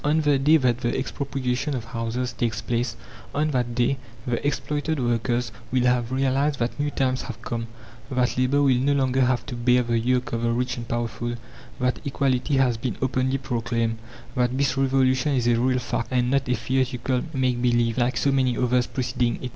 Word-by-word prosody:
On 150 +2 +2
the 145 -3 +3
day 150 +4 +5
that 125 -4 +1
the 120 -2 -1
expropriation 135 0 -2
of 120 - -3
houses 115 +1 -3
takes 115 -2 -1
place, 120 +1 -1 0.4
on 150 +1 +1
that 120 -3 -1
day, 125 +3 +2 0.3
the 120 -2 -1
exploited 150 +1 -1
workers 120 0 0 0.2
will 130 -1 +2
have 125 -1 +2
realized 135 +2 +1
that 120 +3 -2
new 145 0 +1
times 130 -2 0
have 110 - -7
come, 115 -1 -3 0.4
that 125 -2 +1
Labour 130 +3 +2
will 130 -3 +4
no 140 +2 +2
longer 130 -1 +2
have 125 -1 +2
to 125 - -5
bear 125 +1 +3
the 115 -1 0
yoke 125 +2 0
of 115 - -1
the 115 - +1
rich 125 +2 -1
and 120 -1 -7
powerful, 120 0 -2 0.4
that 125 0 0
Equality 135 -1 0
has 125 -4 +3
been 115 -1 -3
openly 130 +1 0
proclaimed, 115 -3 -1 0.3
that 125 0 0
this 140 -1 +1
Revolution 135 +1 +2
is 125 -2 +1
a 120 -1 +3
real 130 +1 +2
fact, 120 -1 -2
and 125 -1 +1
not 135 -2 +1
a 125 - +3
theatrical 125 +1 0
make 130 -4 0
believe, 120 -1 +2
like 125 +1 +1
so 140 - +2
many 130 -3 +2
others 125 0 +2
preceding 125 -2 -1
it. 125 - -3
125 Hz, 195 wpm, -24 LUFS, 120-135 Hz, 0.4 s, day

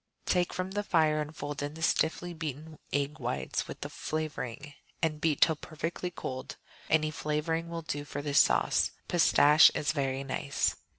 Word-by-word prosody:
Take 180 -1 +1
from 185 +1 -3
the 205 +1 -1
fire 155 -6 +2
and 150 +1 -6
fold 145 0 -4
in 145 +1 -4
the 160 - -6
stiffly 165 +2 +1
beaten 155 -1 -6
egg 145 +2 -1
whites - - -2
with - - -8
the - - -4
flavoring, 150 -2 -4 0.3
and 155 -2 -1
beat 160 -3 +1
till 160 - +6
perfectly 165 +3 -4
cold. 130 -5 -6 0.3
Any 155 -1 +3
flavoring 155 +2 -2
will 170 -1 -5
do 145 -2 -3
for 145 0 -6
this 145 -1 +3
sauce; - - +2 0.2
pistache 155 -3 +6
is 150 - +1
very 135 -3 -1
nice. 140 +1 -1
155 Hz, 170 wpm, -30 LUFS, 145-165 Hz, 0.3 s, till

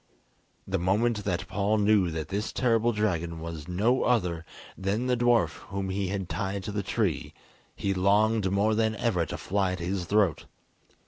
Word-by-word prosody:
The 95 0 -1
moment 105 +4 +1
that 95 -1 -1
Paul 100 +3 +1
knew 105 -3 +3
that 80 -1 -4
this 100 +2 -2
terrible 115 -1 +2
dragon 85 -6 -1
was 80 -2 -7
no 110 +9 +2
other 90 -9 +1 0.3
than 100 +5 -1
the 125 -1 +2
dwarf 120 -1 +2
whom 95 -1 -3
he 95 0 -1
had 95 -1 -3
tied 95 +1 -3
to 105 - -4
the 100 0 -1
tree, - - -1 0.4
he 100 - -1
longed 100 +2 +3
more 100 +3 +2
than 110 0 +1
ever 100 -6 0
to - - -5
fly 95 -1 0
at 90 - -5
his 90 +1 -2
throat. 100 -3 +2
100 Hz, 175 wpm, -28 LUFS, 90-110 Hz, 0.4 s, knew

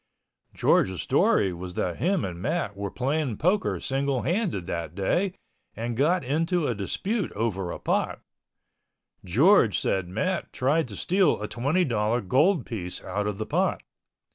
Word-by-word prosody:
George's 95 -2 +2
story 95 -2 +3
was 90 +1 -7
that 90 -2 -1
him 185 +1 +1
and 90 -2 -6
Matt 150 - -1
were 100 0 -4
playing 135 0 -1
poker 185 +6 +1
single 135 -1 -1
handed 175 - -1
that 85 -1 -4
day 175 - 0 0.4
and 115 +1 -3
got 160 +8 +2
into 165 +5 0
a 125 - +1
dispute 190 - -2
over 100 -4 -2
a - - -5
pot. - - -1 1.0
George 120 - +4
said 95 -2 0
Matt 170 - -2
tried 145 +4 +1
to 105 - -9
steal 185 - +2
a 105 - -3
twenty 145 +12 +1
dollar 115 -2 +1
gold 140 - +2
piece 90 -6 -6
out 105 0 -2
of 105 -2 -3
the 110 - -3
pot. - - 0
120 Hz, 155 wpm, -26 LUFS, 100-165 Hz, 1.0 s, George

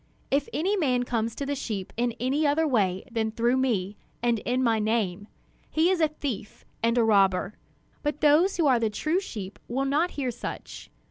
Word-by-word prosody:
If 280 +1 +1
any 380 +6 0
man 255 -9 +1
comes 230 -2 -2
to 280 - -4
the 285 - -1
sheep 215 -8 -4
in 240 0 0
any 275 +5 +1
other 315 +3 +2
way 195 -8 +1
than 225 -1 0
through 235 +3 +1
me 210 -6 0 0.3
and 235 -2 +2
in 250 +4 0
my 225 -2 +2
name, 210 -3 -1 0.4
he 325 +4 +3
is 365 -3 +1
a 315 - +5
thief 280 -9 -6 0.2
and 230 +1 +2
a 235 - +5
robber; 195 -2 +3 0.5
but 295 0 -2
those 310 +6 +4
who 335 - +2
are 255 -4 +4
the 225 -1 +1
true 310 - 0
sheep 210 - -7
will 265 +3 -1
not 300 +6 +2
hear 260 -3 -1
such. 240 - -7
245 Hz, 195 wpm, -27 LUFS, 220-290 Hz, 0.5 s, a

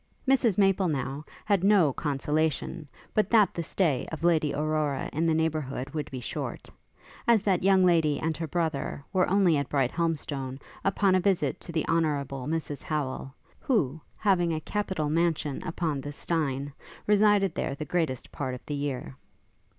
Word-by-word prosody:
Mrs 250 -7 +3
Maple, 195 -2 +3
now, 140 -1 -2 0.2
had 200 -4 +2
no 195 -8 +5
consolation 150 +1 -1 0.3
but 210 -2 +2
that 215 -4 +5
the 170 - -3
stay 160 -5 0
of 160 0 -6
Lady 160 -4 +3
Aurora 150 -1 -1
in 160 +3 +1
the 160 - +3
neighbourhood 150 -4 -1
would 150 -1 -4
be 130 - -5
short, 120 - -5 0.6
as 230 -4 +5
that 190 -4 +2
young 190 -1 +5
lady 160 -5 +3
and 160 0 -1
her 165 +1 -4
brother 155 -3 -2
were 185 -1 +3
only 185 -4 +4
at 140 -1 -2
Brighthelmstone 140 -2 -1 0.3
upon 195 0 +2
a 185 - +4
visit 180 -7 +1
to - - -8
the 160 -2 -1
Honourable 145 -5 0
Mrs 155 -2 -3
Howel; 135 -3 -3 0.3
who, 160 - 0 0.2
having 180 -5 +2
a 155 - -3
capital 190 -5 -2
mansion 155 -2 0
upon 160 -5 -2
the 145 - -6
Steyne, 145 -3 -2 0.3
resided 205 -3 +4
there 135 - -2
the 150 - -5
greatest 155 -5 -2
part 130 -3 -3
of 125 - -12
the 150 - -4
year. 140 - -3
160 Hz, 165 wpm, -28 LUFS, 140-180 Hz, 0.6 s, no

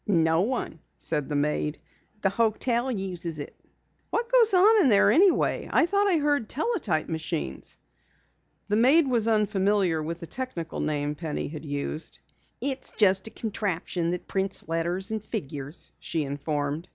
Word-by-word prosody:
"No 165 -4 +3
one," 225 -6 -2 0.2
said 150 -3 -2
the 145 - -2
maid. 150 +1 0 0.5
"The 195 - +3
hotel 235 +3 +1
uses 180 -7 -3
it." 145 - -7 0.5
"What 470 +1 -2
goes 480 -3 +5
on 410 +4 +6
in 275 - +4
there 205 -3 +5
anyway? 370 +3 +3
I - - +4
thought 405 +3 +2
I 365 -4 +3
heard 290 -6 0
teletype 280 - -1
machines." 115 - -4 0.9
The 210 0 +1
maid 275 +7 +5
was 235 -4 +2
unfamiliar 200 -5 +2
with 165 +2 -4
the 170 - -7
technical 180 -7 -5
name 150 -1 -1
Penny 155 0 -4
had 155 +1 -8
used. 145 +2 -3 0.4
"It's 270 -1 0
just 195 -2 +4
a - - -5
contraption 195 -6 -2
that 180 0 -4
prints 195 0 0
letters 170 +4 -1
and 220 -1 -3
figures," 145 - -6
she 160 - -2
informed. 145 +2 -3
190 Hz, 150 wpm, -26 LUFS, 160-240 Hz, 0.9 s, on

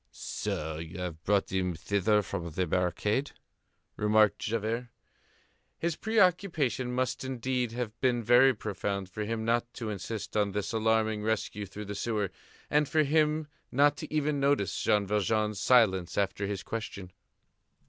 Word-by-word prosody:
"So 80 0 -4
you 80 +1 -7
have 90 -3 -5
brought 100 -1 +1
him 90 -2 0
thither 100 +5 +1
from 90 -3 -4
the 90 +3 -1
barricade?" 90 - 0 0.6
remarked 105 0 +4
Javert. 115 +2 -2 0.9
His 170 -1 -1
preoccupation 180 - +1
must 130 +1 -1
indeed 125 -2 -2
have 120 -3 -4
been 120 -3 +2
very 125 +4 +6
profound 100 -2 -3
for 105 +2 -3
him 110 0 -2
not 120 +1 +1
to 115 -3 -4
insist 105 +1 -5
on 100 -2 +1
this 105 +3 -2
alarming 110 -1 +1
rescue 105 -1 -2
through 105 +3 -8
the 100 - -5
sewer, 105 -2 -1 0.4
and 150 -1 +2
for 155 -1 +3
him 155 +1 +2 0.2
not 145 +2 +4
to 155 +1 -7
even 150 -1 0
notice 140 -7 +1
Jean 105 -1 +2
Valjean's 105 0 0
silence 95 -9 +3
after 100 0 0
his 100 -2 -4
question. 100 -5 -6
110 Hz, 150 wpm, -29 LUFS, 100-130 Hz, 0.9 s, very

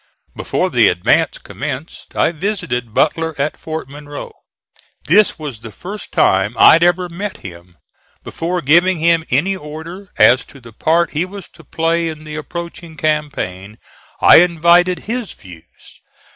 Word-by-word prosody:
Before - - -2
the - - +4
advance - - +1
commenced 145 +2 -7
I - - +2
visited 150 - -3
Butler 160 +5 0
at 145 +2 -1
Fort 160 -3 -6
Monroe. 145 +1 -9 0.7
This 200 +9 +3
was 145 -8 -7
the 115 0 -10
first 195 - -9
time 95 +4 +2
I - - +8
had 165 - +4
ever 175 +1 +2
met 190 +4 -6
him. 85 -1 -11 0.5
Before 175 +1 -3
giving 170 +6 +4
him 165 0 +2
any 170 +10 +1
order 165 +4 -9
as 125 +2 +5
to 140 - -16
the 115 -3 -15
part 165 +8 +1
he 155 +3 -1
was 190 +1 -9
to 165 - -18
play 165 +3 -1
in 155 -1 -8
the 155 0 -8
approaching 170 +1 -8
campaign 140 -11 -3 0.4
I - - +8
invited 175 +1 +4
his 235 0 -4
views. 85 -5 -17
160 Hz, 150 wpm, -17 LUFS, 140-175 Hz, 0.7 s, I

